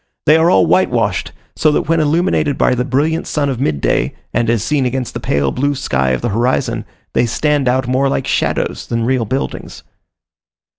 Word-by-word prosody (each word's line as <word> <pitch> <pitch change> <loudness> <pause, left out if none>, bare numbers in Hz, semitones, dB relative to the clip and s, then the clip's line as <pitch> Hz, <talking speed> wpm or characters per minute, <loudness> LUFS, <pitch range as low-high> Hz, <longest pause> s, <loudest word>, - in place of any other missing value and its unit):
They 155 - +6
are 160 +1 +4
all - - +4
whitewashed; 115 - +1 0.2
so 155 - +2
that - - +1
when 165 +1 +1
illumined 155 -1 +1
by - - +3
the 125 0 0
brilliant 145 +5 0
sun 145 -2 -1
of 130 -3 -3
midday, 75 - 0 0.2
and 115 0 +1
as 115 -3 +1
seen 150 -3 0
against 125 0 -3
the - - -4
pale 70 -1 0
blue 145 +2 0
sky 65 - 0
of 65 - -1
the 120 - -1
horizon, 115 0 0 0.3
they 120 - +2
stand 145 +3 0
out 130 0 0
more 130 +2 +1
like 135 - -1
shadows - - -1
than 115 -1 -1
real 125 -2 +1
buildings. 130 +6 -4
130 Hz, 190 wpm, -16 LUFS, 115-145 Hz, 0.3 s, They